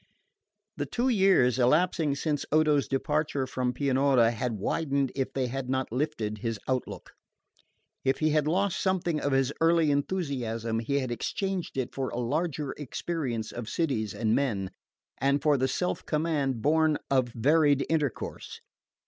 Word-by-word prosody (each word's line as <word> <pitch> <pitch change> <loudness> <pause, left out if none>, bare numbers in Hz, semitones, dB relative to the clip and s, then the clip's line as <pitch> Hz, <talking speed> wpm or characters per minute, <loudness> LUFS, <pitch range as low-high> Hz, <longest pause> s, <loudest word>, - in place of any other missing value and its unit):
The - - -2
two 250 +2 0
years 190 - +4
elapsing 150 +3 +2
since 145 0 -1
Odo's 150 -2 +3
departure 145 0 0
from 130 -1 -1
Pianura 130 -2 +3
had 120 +1 -2
widened 140 +4 0
if 135 -1 -2
they 135 -1 -1
had 130 +1 -4
not 130 -2 -1
lifted 120 -6 -2
his 115 -1 -3
outlook. 130 -1 -3 0.9
If 135 0 +2
he 155 0 +1
had 150 -1 +2
lost 190 +4 +1
something 175 -4 0
of 145 - -1
his 135 +1 +2
early 165 -2 +4
enthusiasm 130 -8 -1
he 140 +5 -1
had 130 -3 -2
exchanged 185 - -3
it 130 -2 -2
for 135 -1 -2
a - - -6
larger 145 +3 -1
experience 135 -5 -3
of 120 -2 -6
cities 115 - -1
and 110 -1 +1
men, 105 -9 0 0.5
and 140 +2 +2
for 150 +1 +3
the 130 -1 +1
self 180 +7 -2
command 150 -6 0
born 155 0 +3
of 130 -2 +3
varied 145 +4 +3
intercourse. 150 -7 -3
140 Hz, 150 wpm, -28 LUFS, 125-155 Hz, 0.9 s, years